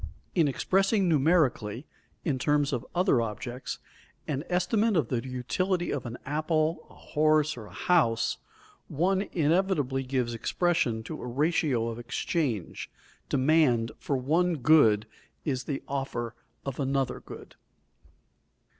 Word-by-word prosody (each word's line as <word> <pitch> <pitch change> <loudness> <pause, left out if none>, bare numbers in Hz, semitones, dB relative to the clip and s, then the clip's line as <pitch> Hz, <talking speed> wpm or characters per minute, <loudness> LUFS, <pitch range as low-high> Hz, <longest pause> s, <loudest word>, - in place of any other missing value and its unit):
In 165 -5 +3
expressing 195 - +2
numerically, 145 -7 +2 0.4
in 140 -6 0
terms 145 +1 +2
of 120 - -1
other 180 -9 +3
objects, 120 +3 -5 0.5
an 140 -1 -2
estimate 190 +4 +2
of 140 -8 +1
the 120 -2 -1
utility 170 +9 -1
of 135 -4 -3
an 120 +1 -6
apple, 155 +2 0
a - - -17
horse 155 0 +2
or 110 -4 -9
a - - -14
house, 135 -11 +2 0.5
one 185 +6 +1
inevitably 155 -5 +1
gives 125 -2 -1
expression 120 - 0
to - - -7
a - - -5
ratio 140 -2 +1
of 115 0 -4
exchange; 120 - -2 0.4
demand 130 -5 +3
for 140 - -1
one 165 +7 +1
good 120 -7 +5 0.4
is 130 -4 -1
the 140 -2 -3
offer 130 -4 -3 0.3
of 135 -1 -4
another 135 -1 0
good. - - -11
140 Hz, 130 wpm, -28 LUFS, 125-165 Hz, 0.5 s, good